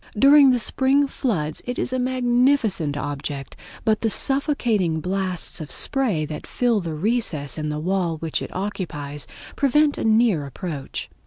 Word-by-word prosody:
During 280 +3 +7
the 250 - +4
spring 270 +4 +2
floods 175 - -2
it 245 - -3
is 255 - -2
a 255 - 0
magnificent 245 - +1
object, 145 -1 -5 0.3
but 220 -2 +2
the 225 - +1
suffocating 230 - +1
blasts 185 -1 -2
of 150 - -7
spray 220 - +1
that 150 0 -7
fill 240 -3 +1
the 165 -4 -4
recess 160 - 0
in 155 -1 -3
the 150 - -3
wall 175 0 -1
which 160 0 -2
it - - -5
occupies 155 -7 -5 0.3
prevent 290 +2 +2
a - - -2
near 220 -7 +3
approach. 145 -1 -5
195 Hz, 155 wpm, -23 LUFS, 155-250 Hz, 0.3 s, During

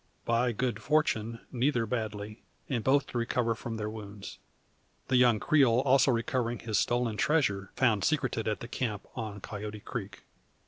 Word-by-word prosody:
By 120 +1 +2
good 115 -1 -2
fortune, 115 -6 +1
neither 125 -1 +1
badly, 105 -2 -4 0.3
and 120 -5 -1
both 140 +1 +3
to 120 - -3
recover 115 0 +1
from 115 0 -6
their 105 -1 -3
wounds; 105 -2 -8 0.7
the 130 - +3
young 120 -3 +5
Creole 130 -4 +4
also 135 0 +4
recovering 120 0 0
his 110 -2 -1
stolen 120 -3 0
treasure, 100 -12 +1
found 110 -6 +2
secreted 130 -7 0
at 110 - -1
the 120 - -6
camp 115 -5 -3
on 110 -4 -5
Coyote 105 0 -6
creek. 100 -5 -6
115 Hz, 155 wpm, -30 LUFS, 105-125 Hz, 0.7 s, young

